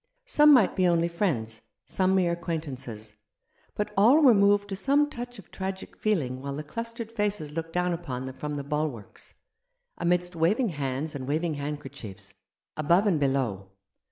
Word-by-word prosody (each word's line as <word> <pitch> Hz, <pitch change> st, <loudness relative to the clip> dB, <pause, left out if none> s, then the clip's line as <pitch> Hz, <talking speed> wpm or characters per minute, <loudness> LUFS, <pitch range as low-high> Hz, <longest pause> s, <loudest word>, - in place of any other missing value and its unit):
Some 300 Hz, -11 st, +6 dB
might 250 Hz, -8 st, +5 dB
be 185 Hz, -1 st, +3 dB
only 170 Hz, -1 st, +3 dB
friends, 135 Hz, -, -2 dB, 0.2 s
some 190 Hz, 0 st, +1 dB
mere 180 Hz, -2 st, +3 dB
acquaintances; 135 Hz, -11 st, -5 dB, 0.6 s
but 210 Hz, 0 st, -3 dB
all 235 Hz, +10 st, +6 dB
were 255 Hz, -4 st, +8 dB
moved 205 Hz, 0 st, +4 dB
to 195 Hz, -, -3 dB
some 280 Hz, +8 st, +2 dB
touch 245 Hz, -2 st, -7 dB
of 200 Hz, -, -14 dB
tragic 190 Hz, 0 st, -5 dB
feeling 140 Hz, -12 st, -1 dB
while 140 Hz, 0 st, -4 dB
the 150 Hz, -, -5 dB
clustered 230 Hz, +6 st, -6 dB
faces 205 Hz, -8 st, -2 dB
looked 165 Hz, +1 st, -5 dB
down 180 Hz, 0 st, +1 dB
upon 130 Hz, -7 st, -5 dB
them 130 Hz, 0 st, -7 dB
from 150 Hz, +1 st, -4 dB
the 140 Hz, -, -4 dB
bulwarks, 145 Hz, -7 st, -4 dB, 0.6 s
amidst 175 Hz, +1 st, 0 dB
waving 205 Hz, +9 st, +2 dB
hands 140 Hz, -1 st, -3 dB
and 130 Hz, -3 st, -6 dB
waving 160 Hz, +3 st, 0 dB
handkerchiefs, 135 Hz, -9 st, -6 dB, 0.4 s
above 170 Hz, +7 st, +3 dB
and 185 Hz, -7 st, +2 dB
below. 130 Hz, -9 st, -1 dB
170 Hz, 160 wpm, -27 LUFS, 140-200 Hz, 0.6 s, were